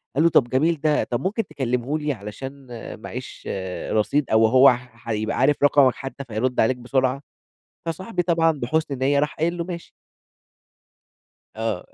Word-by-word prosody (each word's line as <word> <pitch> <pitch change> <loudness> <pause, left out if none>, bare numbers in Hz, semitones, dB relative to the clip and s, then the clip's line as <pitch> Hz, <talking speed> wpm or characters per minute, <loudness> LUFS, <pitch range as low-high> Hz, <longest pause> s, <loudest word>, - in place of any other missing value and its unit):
قال 150 - +3
له: 170 - +6
"طب 125 -6 +3
جميل 150 +4 +1
ده، 155 -1 +2
طب 120 - -2
ممكن 215 - -1
تكلّمه 130 -1 -1
لي 150 -1 -1
علشان 130 +5 -8 0.3
معاييش - - -7 0.4
رصيد 125 +6 +1
أو 110 0 +5
هو 130 +4 +7
ح 125 -2 -8
هيبقى 110 0 -1
عارف 140 +2 +2
رقمك 140 -3 +5
حتّى 135 +1 -7
فيرُد 125 +1 -2
عليك 125 +3 +3
بسرعة." 130 +2 0 0.7
فصاحبي 185 +4 -2
طبعًا 165 -1 +3
بحُسن 145 0 -2
نِيّة 140 +2 +2
راح 150 +1 0
قايل 170 +3 -1
له: 170 - -1
"ماشي." 170 -1 -7 1.6
آه. - - -3
135 Hz, 155 wpm, -23 LUFS, 125-155 Hz, 1.6 s, هو